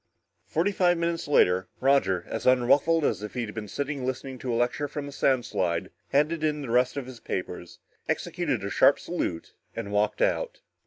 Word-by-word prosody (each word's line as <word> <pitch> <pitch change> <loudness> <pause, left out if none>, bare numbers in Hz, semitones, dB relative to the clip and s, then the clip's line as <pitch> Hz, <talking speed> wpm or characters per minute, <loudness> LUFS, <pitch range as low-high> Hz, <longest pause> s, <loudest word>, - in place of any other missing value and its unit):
Forty 175 +6 +1
five 175 -3 +3
minutes 170 -1 -1
later, 95 -10 +3
Roger, 130 -10 +3
as - - -3
unruffled 145 +6 +4
as 100 -7 0
if 105 +3 -7
he 125 -2 -1
had 105 - -8
been 110 -2 -5
sitting 140 +4 -3
listening 130 0 -4
to 125 - -3
a - - 0
lecture 120 +5 0
from 145 0 -5
a - - -7
sound 130 -3 +1
slide, 85 -2 -1 0.2
handed 155 +3 +1
in 150 -1 0
the 120 - -5
rest 125 +3 +2
of 140 - -3
his 125 -2 -10
papers, 90 -4 -5 0.3
executed - - -1
a - - -3
sharp - - +5
salute 80 - -4 0.2
and 110 -3 -5
walked 105 +1 +1
out. - - -1
130 Hz, 195 wpm, -27 LUFS, 105-145 Hz, 0.3 s, sharp